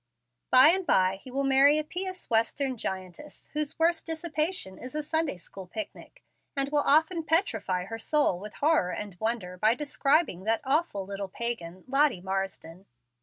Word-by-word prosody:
By 260 +4 +8
and 380 +3 +2
by 190 - +2
he 225 - -12
will 275 +2 -2
marry 275 +2 +5
a 310 - 0
pious 370 +4 -5
Western 250 +4 0
giantess, 190 +5 -6
whose 300 -1 -2
worst 330 +1 +1
dissipation 320 - -1
is 255 +3 -8
a 305 - -2
Sunday 315 - 0
school 185 +2 -8
picnic, 320 - -8 0.3
and 275 0 0
will 295 0 +2
often 320 +4 +4
petrify 235 - 0
her 225 +3 -7
soul 290 - +1
with 210 +2 -9
horror 300 - +2
and 205 -3 -6
wonder 220 -5 -2
by 220 +3 +4
describing 280 - +1
that 225 +1 +1
awful 270 - 0
little 200 0 -5
pagan, 185 -6 -4
Lottie 275 -5 +3
Marsden. 190 -1 -5
260 Hz, 165 wpm, -28 LUFS, 195-305 Hz, 0.3 s, By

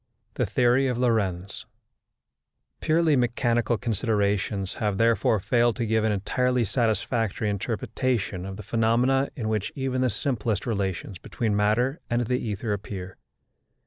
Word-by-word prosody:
THE - - -1
THEORY 125 +2 +3
OF 125 -2 -1
LORENTZ 100 -6 -1 1.1
Purely 160 -1 +3
mechanical 120 -1 +1
considerations 105 -4 -1
have 105 -3 0
therefore 115 -1 +3
failed 120 +4 +2
to 120 - -2
give 110 0 +1
an 110 - +2
entirely 125 +5 +1
satisfactory 110 -1 0
interpretation 110 -2 -2
of 95 0 -6
the 105 - -8
phenomena 120 +5 +2
in 115 -6 -3
which 110 -2 -1
even 130 -2 -1
the 130 - +2
simplest 115 -4 -2
relations 100 -4 -3
between 110 -3 -2
matter 110 +7 +1
and 120 0 +1
the 125 +2 0
ether 105 0 -2
appear. 95 -2 -6
115 Hz, 135 wpm, -26 LUFS, 105-125 Hz, 1.1 s, THEORY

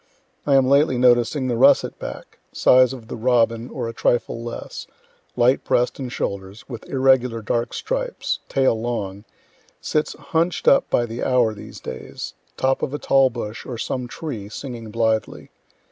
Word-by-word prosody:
I 140 - +4
am 135 -1 +5
lately 140 -1 +4
noticing 125 +2 +3
the 120 - 0
russet 135 +4 +4
back, - - -8
size 130 0 +5
of 125 -4 -9
the - - -6
robin 115 0 +1
or 120 -3 -4
a 115 - -5
trifle 115 0 0
less, 120 - -7 0.5
light 125 +2 +3
breast 125 +3 +1
and 130 -2 -5
shoulders, 100 0 -5
with 120 -4 -9
irregular 130 -4 +2
dark 115 +2 -1
stripes - - -3
tail 135 -2 +3
long 105 -4 -4 0.5
sits 155 0 -1
hunch'd 165 +1 -1
up - - +5
by 120 - +2
the 115 +1 -5
hour 125 -4 +2
these 105 - -10
days, 65 - -7 0.2
top 130 0 +1
of 145 - -2
a - - -1
tall 135 -2 +4
bush, 115 -2 -6
or 125 - -6
some 125 +2 -3
tree, 120 -8 -6
singing 115 -1 -7
blithely. 110 0 -1
120 Hz, 160 wpm, -22 LUFS, 115-135 Hz, 0.5 s, am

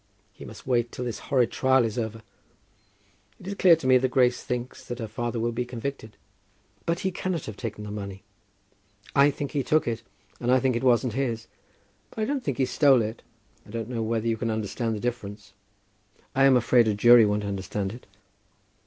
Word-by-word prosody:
He - - -11
must - - -11
wait 120 -2 +1
till 125 - -5
this 120 - -4
horrid 125 -4 +3
trial 130 -1 +3
is 110 - -3
over. 110 -1 -4 1.2
It - - -14
is 195 - -3
clear 185 -3 +6
to 160 - -9
me 130 0 +6
that 130 +1 0
Grace 125 -1 +2
thinks 125 +1 -5
that 120 - -5
her 115 -2 -5
father 120 +2 -3
will 120 +1 0
be 120 +2 -2
convicted." 120 -3 -6 0.7
"But 170 0 0
he 190 -2 0
cannot 180 -3 -3
have 110 - -7
taken 105 -2 -6
the 105 - -7
money." 100 -2 -7 0.9
"I 140 +1 +6
think 140 0 -4
he 145 - 0
took 155 +2 +1
it, 115 -1 -2 0.4
and 120 +1 0
I 130 - +5
think 130 -1 +1
it 120 - -1
wasn't 125 -2 +3
his. 120 -3 -2 0.6
But - - -20
I - - +1
don't 275 0 -2
think 135 - -2
he 130 - +2
stole 135 -4 +4
it. 110 +2 -5 0.4
I - - -19
don't 115 +1 -5
know 120 -2 -3
whether 115 0 -1
you 115 -1 +1
can 115 +1 -2
understand 110 +1 -2
the - - -5
difference." 105 -4 -5 0.8
"I 135 0 +4
am 135 -2 +6
afraid 120 -1 +4
a 105 - +1
jury 120 +2 +7
won't 105 0 +1
understand 100 0 -3
it." 120 - -12
120 Hz, 205 wpm, -26 LUFS, 110-130 Hz, 1.2 s, jury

